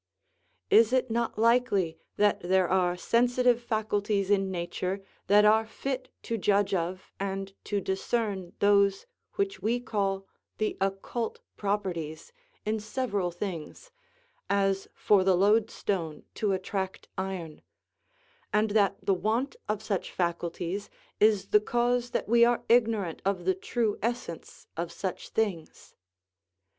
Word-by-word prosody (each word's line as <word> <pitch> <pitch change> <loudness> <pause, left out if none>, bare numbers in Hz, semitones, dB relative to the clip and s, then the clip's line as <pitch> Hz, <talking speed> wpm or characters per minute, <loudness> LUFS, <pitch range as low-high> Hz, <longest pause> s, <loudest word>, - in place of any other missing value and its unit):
Is 230 +2 +6
it 255 -2 +2
not 235 -1 -1
likely 220 -8 +2 0.2
that 205 0 +3
there 185 +1 +2
are 180 -1 +2
sensitive 245 +3 +3
faculties 210 -3 0
in 195 -1 +3
nature 185 +2 -3 0.2
that 205 +2 +6
are 220 +1 +5
fit 255 +3 -4
to 230 -1 -2
judge 200 0 +2
of 185 +1 -2
and 195 0 -3
to 205 - 0
discern 195 -1 -2
those 200 -1 +3 0.3
which 395 0 -1
we 235 +3 +1
call 195 -5 -1 0.3
the 215 - -1
occult 195 +4 -2 0.2
properties 190 - -3 0.3
in 215 +1 0
several 210 -4 -1
things, 175 - -6 0.6
as 195 -1 +1
for 200 -3 +4
the 185 -1 +4
loadstone 200 -5 +1
to 210 -2 0
attract 190 0 -3
iron; 185 -5 -5 0.9
and 210 0 +2
that 200 -2 +3
the 195 - +4
want 225 +8 0
of 210 0 -1
such 200 -3 -2
faculties 175 +2 -2 0.3
is 210 -2 +3
the 210 - +5
cause 240 +2 +1
that - - -2
we 235 +2 +5
are 240 0 +3
ignorant 225 -7 +2
of 190 -3 -1
the 190 - +3
true 215 +3 -1
essence 235 -7 -4
of 170 +1 -3
such 185 +1 -5
things? 195 -8 -3
200 Hz, 130 wpm, -28 LUFS, 190-225 Hz, 0.9 s, Is